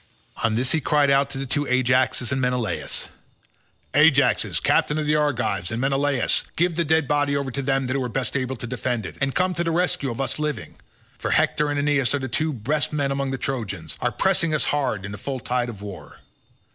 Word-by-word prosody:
On 115 -2 0
this 125 +3 +2
he 160 - +2
cried 145 0 +3
out 140 0 +3
to 140 - -6
the 135 - -3
two 145 +2 -1
Ajaxes 125 0 +2
and 135 -1 0
Menelaus, 125 -3 -1 0.8
"Ajaxes - - +4
captains 150 +1 +2
of 155 - -1
the 150 +1 +2
Argives, 120 -11 0
and 110 - -2
Menelaus, 135 +1 +1
give 175 +1 +2
the 170 +1 0
dead 160 -2 +2
body 145 0 +1
over 140 -2 -3
to 140 - -2
them 135 0 0
that 130 +2 -2
are 130 -3 -1
best 130 +3 -2
able 130 -1 -1
to 120 - -5
defend 120 -2 -2
it, - - -7
and 135 -1 0
come 185 0 +2
to 170 0 -1
the 165 - -1
rescue 165 -5 +1
of 115 - -5
us 135 +2 -1
living; 150 -1 -3 0.4
for - - -2
Hector 150 0 +2
and 145 - -1
Aeneas 145 -3 +2
who - - +2
are - - -6
the 130 - -3
two 155 +6 -1
best 145 +4 0
men 140 -2 0
among 135 0 -1
the 135 - -2
Trojans, 105 - -4
are 120 - +1
pressing 170 -3 +1
us 150 - +1
hard 125 -9 -1
in 100 - -6
the 100 - -7
full 135 -2 -4
tide 125 0 -1
of 105 -4 -9
war. 100 -3 -9
135 Hz, 225 wpm, -23 LUFS, 125-145 Hz, 0.8 s, Ajaxes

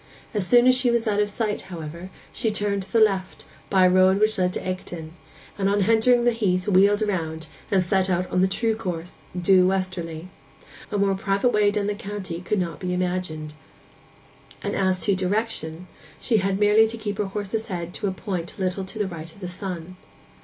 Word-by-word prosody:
As 205 -4 0
soon 245 0 +6
as 255 0 +6
she 255 -1 +2
was 235 -1 +1
out 205 -1 +1
of 210 - 0
sight, 210 0 -2
however, 170 +1 -7 0.2
she 225 - 0
turned 205 -1 -1
to 190 0 -12
the 230 - +3
left, 195 -4 +1 0.2
by 190 -1 +5
a - - +6
road 185 +1 +5
which 215 -1 +2
led 180 0 +1
into - - -6
Egdon, 175 -3 -5 0.5
and 195 0 +2
on 200 0 +2
entering 230 +3 +4
the 240 - +4
heath 195 -5 0
wheeled 205 +2 +4
round, 160 -6 -2 0.2
and 190 -2 +3
set 190 +1 +1
out 180 0 -1
in 180 - +3
the 190 - +4
true 220 +3 0
course, 180 -5 -6 0.2
due 185 0 +5
westerly. 185 -3 -3 0.6
A 205 - 0
more 200 -1 +2
private 195 +4 +1
way 210 -1 +4
down 205 0 -1
the 205 - 0
county 195 -4 -6
could 200 +4 -1
not 170 -3 -3
be 180 -1 -2
imagined; 180 -4 -3 1.1
and - - -2
as 190 -1 +1
to 200 - +2
direction, 185 -3 -2 0.3
she 230 - +1
had 195 -1 0
merely 210 +1 +5
to 230 +1 -5
keep 205 -2 -4
her 210 - +1
horse's 210 +3 -4
head 175 -3 -5
to - - -3
a - - 0
point 180 -2 -5
a - - -7
little 185 +1 -1
to 190 +4 -9
the 210 - 0
right 165 -3 -8
of 200 - -18
the 185 - -5
sun. 180 -1 -6
190 Hz, 210 wpm, -24 LUFS, 180-210 Hz, 1.1 s, soon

